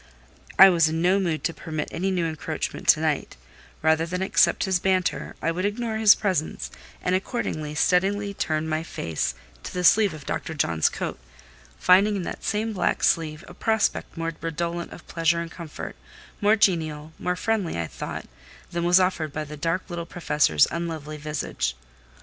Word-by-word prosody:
I 195 0 +10
was 165 -3 +4
in 160 +1 -2
no 185 +3 +4
mood 170 -5 -1
to 165 - 0
permit 155 -2 -4
any 190 +3 -1
new 180 -3 0
encroachment 160 -2 -4
to - - +7
night: - - -1 0.5
rather 160 0 +3
than 180 +2 -2
accept 190 - +3
his 190 -2 +1
banter, 185 0 0
I 165 - +2
would 180 +2 -3
ignore 220 +2 -1
his 220 -2 +7
presence, 185 -7 -2 0.3
and 180 - +1
accordingly 155 -6 -2
steadily 200 +5 +2
turned 155 -4 -1
my 155 0 -1
face 80 - -3 0.3
to - - -7
the 180 - -3
sleeve 200 -1 +5
of 150 - -11
Dr. 160 - -3
John's 85 - +2
coat; - - -5 0.6
finding 200 +3 +5
in 190 - -2
that - - -6
same 220 +1 -1
black 185 - 0
sleeve 155 -2 +1
a - - -11
prospect 220 -2 0
more 165 0 -2
redolent 170 +1 -3
of - - -12
pleasure 165 0 +1
and 170 0 -5
comfort, 165 -3 -7 0.5
more 205 +1 +5
genial, 160 -6 +1
more 180 0 -1
friendly, 195 - -1
I 85 - -1
thought, - - -6 0.5
than 170 0 -2
was 175 +2 +6
offered 180 -5 0
by 155 +2 -3
the 150 0 -8
dark 165 +5 -1
little 170 -1 -5
Professor's 150 - +2
unlovely 160 -3 -4
visage. 150 0 -3
170 Hz, 175 wpm, -25 LUFS, 155-190 Hz, 0.6 s, I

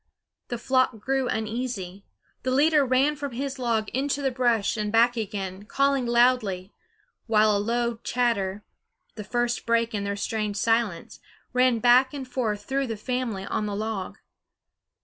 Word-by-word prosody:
The 240 - -3
flock 255 0 +1
grew 265 +3 0
uneasy; 220 -4 -4 0.4
the 255 - -2
leader 295 +3 +4
ran 270 +3 +2
from 285 -3 -5
his 275 +2 -4
log 230 -3 0
into 280 +2 -1
the 270 - +1
brush 240 -5 +1
and 210 -1 -2
back 235 +2 +4
again, 200 -3 -4
calling 275 +1 +1
loudly, 235 -6 +2 0.5
while 215 -1 +4
a 200 - +1
low 235 +1 -1
chatter, 210 -5 0 0.5
the 210 - -7
first 240 +2 -1
break 230 0 +2
in 205 -1 -2
their 200 0 -2
strange 210 0 -2
silence, 225 -5 0 0.3
ran 250 -1 +3
back 250 +4 +4
and 270 -2 -6
forth 220 -5 -2
through 270 +2 -1
the 225 -2 -4
family 235 -4 -3
on 210 - -2
the 205 - -3
log. 210 -2 -4
235 Hz, 155 wpm, -26 LUFS, 210-255 Hz, 0.5 s, leader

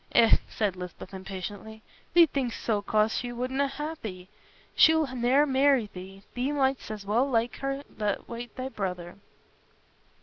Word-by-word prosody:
"Eh," 230 -1 +6
said 205 -4 -1
Lisbeth, 180 +1 -8
impatiently. 195 +3 -7 0.3
"Thee 345 -1 +9
think'st 265 -6 -2
so 215 -3 +1
'cause 215 +2 +2
she 245 -1 -2
wouldna 260 +3 -1
ha' 295 +3 -4
thee. 185 -3 -7 0.4
She'll 320 0 +6
ne'er 255 +4 +4
marry 270 -5 +3
thee; 195 +2 -10
thee 255 +3 -1
mightst 270 -4 0
as 210 -2 -6
well 235 +7 +2
like 235 -1 0
her 275 +1 -3
t' 220 - -10
ha' 235 +3 -3
thy 260 +1 -4
brother." 180 -5 -4
235 Hz, 155 wpm, -28 LUFS, 200-270 Hz, 0.4 s, Thee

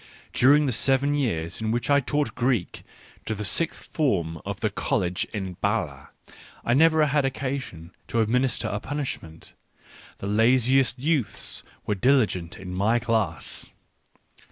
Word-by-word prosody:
During 145 +4 +5
the 135 - +1
seven 135 +4 +2
years 95 - -2
in 110 - -1
which 120 +2 -1
I 140 0 +5
taught 145 +2 -1
Greek 120 -6 -1 0.5
to 110 - -1
the 105 0 -3
sixth 165 +10 +1
form 85 - -1
of 100 +1 -5
the 110 - 0
College 95 -6 -1
at 95 -4 -5
B&le, 95 -10 -1 0.6
I 120 - +2
never 160 +2 +5
had 145 0 +1
occasion 130 -11 -4 0.2
to 115 - -1
administer 125 +3 +1
a 100 - -2
punishment; 125 - -6 0.6
the - - -7
laziest 125 +5 +3
youths 140 -2 0 0.2
were 105 - 0
diligent 100 -7 +1
in 90 -1 -8
my 105 +6 +2
class. 115 -2 -1
120 Hz, 140 wpm, -25 LUFS, 100-135 Hz, 0.6 s, During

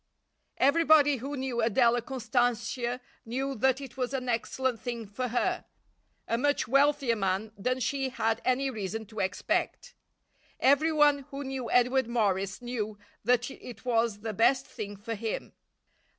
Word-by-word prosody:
Everybody 290 0 +5
who 275 +4 -5
knew 260 -2 -2
Adela 235 +1 +3
Constantia 245 0 -1 0.2
knew 265 +3 -2
that 265 +2 +2
it 265 -2 -9
was 255 +1 -1
an 255 -1 -3
excellent 245 +1 -1
thing 235 -2 -4
for 230 +5 -3
her 245 +1 0 0.6
a 230 - 0
much 285 +2 +1
wealthier 275 -1 +3
man 195 +1 -1
than 250 +6 -1
she 270 +2 -1
had 225 -2 -1
any 265 +1 +1
reason 220 0 -4
to 215 +1 -9
expect. 190 +1 -1 0.7
Everyone 290 0 +4
who 280 +1 -5
knew 265 -3 -4
Edward 250 0 +3
Morris 205 -3 0
knew 215 -4 -3 0.3
that 245 +3 +2
it 240 -3 -11
was 230 -3 +1
the 220 -1 -3
best 245 +5 +3
thing 205 -3 -7
for 225 +3 -5
him. 220 0 -4
245 Hz, 145 wpm, -29 LUFS, 225-265 Hz, 0.7 s, Everybody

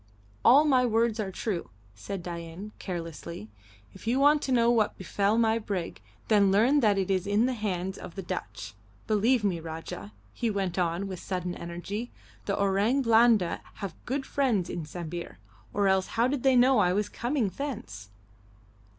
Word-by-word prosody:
"All 285 +5 +7
my 260 -4 +4
words 230 -1 +1
are 205 -3 -1
true," 190 -3 -3 0.2
said 170 - -6
Dain, 170 +4 -7
carelessly. 165 - -6 0.4
"If 195 - -13
you 250 +3 +2
want 290 +1 +5
to 270 - -3
know 235 -1 +4
what 220 -3 +1
befell 200 +3 0
my 225 -1 +3
brig, 180 - -4 0.3
then 200 -3 +4
learn 235 +9 +4
that 210 -6 +3
it 195 0 0
is 190 0 0
in 205 +3 +3
the 255 - 0
hands 190 -4 -3
of 170 - -9
the 195 - -5
Dutch. - - -6 0.3
Believe 220 +3 +2
me, 185 -5 0
Rajah," 160 -10 -7 0.2
he 235 - -1
went 195 -3 -2
on, 175 +2 0
with 185 -2 -6
sudden 180 -2 -3
energy, 175 +8 -5 0.4
"the 200 - -1
Orang 200 +7 +2
Blanda 225 -6 +4
have 195 -4 -5
good 270 +2 -2
friends 235 -13 0
in 165 - -4
Sambir, 170 - -6 0.3
or 200 -1 +1
else 190 -1 +2
how 230 +2 +1
did 270 0 -1
they 265 0 +4
know 250 0 +5
I 180 -3 +3
was 205 +1 0
coming 240 +2 -1
thence?" 180 - -6
200 Hz, 175 wpm, -28 LUFS, 180-235 Hz, 0.4 s, All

